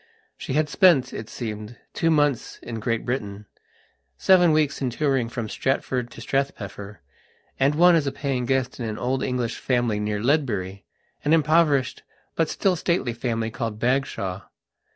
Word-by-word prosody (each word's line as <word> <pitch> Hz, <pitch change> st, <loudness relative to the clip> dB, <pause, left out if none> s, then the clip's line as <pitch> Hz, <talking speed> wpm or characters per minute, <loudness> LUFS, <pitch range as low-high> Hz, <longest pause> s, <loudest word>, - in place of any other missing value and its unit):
She -, -, -5 dB
had 155 Hz, +2 st, +2 dB
spent, 150 Hz, -7 st, +4 dB
it 110 Hz, -, -6 dB
seemed, 110 Hz, 0 st, -6 dB, 0.2 s
two 165 Hz, -, +1 dB
months 145 Hz, -5 st, +1 dB
in 115 Hz, -2 st, -5 dB
Great 115 Hz, +1 st, -2 dB
Britainseven 105 Hz, -, -1 dB
weeks 155 Hz, -3 st, +1 dB
in 130 Hz, -, 0 dB
touring 135 Hz, -2 st, 0 dB
from 115 Hz, -2 st, -4 dB
Stratford 130 Hz, 0 st, -1 dB
to 115 Hz, -, -11 dB
Strathpeffer, 105 Hz, -, -3 dB, 0.6 s
and 140 Hz, +2 st, +3 dB
one 175 Hz, +2 st, +6 dB
as 150 Hz, -4 st, +2 dB
paying 135 Hz, -3 st, -2 dB
guest 130 Hz, -1 st, 0 dB
in 115 Hz, -, -3 dB
an 110 Hz, -, -5 dB
old 130 Hz, +2 st, -1 dB
English 125 Hz, -2 st, -2 dB
family 120 Hz, -5 st, 0 dB
near 105 Hz, 0 st, -2 dB
Ledbury, 105 Hz, -8 st, -1 dB, 0.4 s
an 150 Hz, -, +2 dB
impoverished, 155 Hz, -4 st, +3 dB, 0.3 s
but 165 Hz, -, 0 dB
still 190 Hz, -2 st, +1 dB
stately 170 Hz, -8 st, 0 dB
family, 115 Hz, -1 st, -2 dB
called 115 Hz, -3 st, -4 dB
Bagshawe. 120 Hz, -7 st, -1 dB
125 Hz, 150 wpm, -24 LUFS, 110-145 Hz, 0.6 s, one